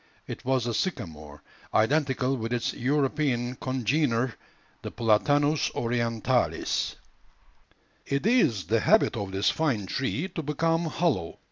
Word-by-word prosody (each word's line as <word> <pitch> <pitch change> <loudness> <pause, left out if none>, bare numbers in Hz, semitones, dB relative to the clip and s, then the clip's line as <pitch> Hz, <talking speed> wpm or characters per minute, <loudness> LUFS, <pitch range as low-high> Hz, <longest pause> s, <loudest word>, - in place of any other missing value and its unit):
It - - -7
was 130 -2 +1
the 120 - -1
sycamore, 75 - -4 0.3
identical 135 +2 +2
with 115 -2 -4
its 120 - -1
European 135 -2 0
congener, 130 -1 0 0.5
the - - -5
Platanus 145 +7 +2
orientalis. 115 -1 0 1.1
It 140 +4 -1
is 210 - +3
the 115 +1 +2
habit 220 - +3
of 100 -4 -4
this 95 +2 +2
fine 135 -11 0
tree 135 - -2
to 175 - -4
become 165 +3 0
hollow. 150 - -1
130 Hz, 120 wpm, -27 LUFS, 115-150 Hz, 1.1 s, is